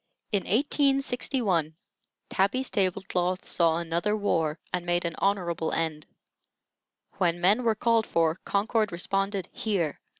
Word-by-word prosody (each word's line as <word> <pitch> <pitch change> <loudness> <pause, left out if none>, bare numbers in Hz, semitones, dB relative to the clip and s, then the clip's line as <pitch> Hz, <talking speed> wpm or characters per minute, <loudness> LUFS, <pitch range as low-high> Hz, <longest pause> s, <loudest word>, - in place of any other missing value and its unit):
In 200 -3 0
1861, 250 - +1 0.5
Tabby's 245 +8 0
table 190 -2 0
cloth 180 +1 -1
saw 165 -2 +3
another 170 +5 -1
war, 165 -6 0 0.2
and 180 -1 -1
made 175 0 0
an 170 - -2
honorable 175 -5 0
end. 155 -2 -2 1.1
When 175 -2 +1
men 200 +7 +4
were 230 -2 +2
called 230 0 +2
for, 165 -1 +2
Concord 215 +1 0
responded 195 +2 -1
"Here!" 180 -9 -1
190 Hz, 125 wpm, -27 LUFS, 170-215 Hz, 1.1 s, men